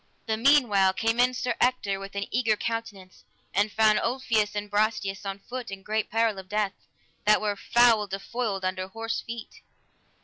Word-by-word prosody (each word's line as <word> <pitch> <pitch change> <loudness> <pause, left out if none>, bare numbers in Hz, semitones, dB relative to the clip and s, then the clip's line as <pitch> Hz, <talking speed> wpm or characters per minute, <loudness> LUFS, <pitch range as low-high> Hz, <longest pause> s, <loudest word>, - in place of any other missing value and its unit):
The 220 - 0
meanwhile 220 -7 +4
came 225 +4 0
in 250 +1 +3
Sir 250 0 -1
Ector 245 -6 +1
with 195 0 -9
an 200 0 -2
eager 225 -2 +2
countenance, 210 -5 -5 0.3
and 205 +2 +2
found 215 -1 +4
Ulfius 230 -4 0
and 205 0 -3
Brastias 205 -2 -1
on 195 0 -4
foot, 245 +4 -7
in 195 -1 -8
great 215 +1 -1
peril 225 -3 +1
of 185 -1 -11
death, 210 -2 0 0.5
that 210 0 +5
were 210 -1 -1
foul 230 0 +3
defoiled 195 +1 -3
under 185 0 -2
horse 225 +3 -4
feet. 230 -1 -9
215 Hz, 170 wpm, -27 LUFS, 195-230 Hz, 0.5 s, that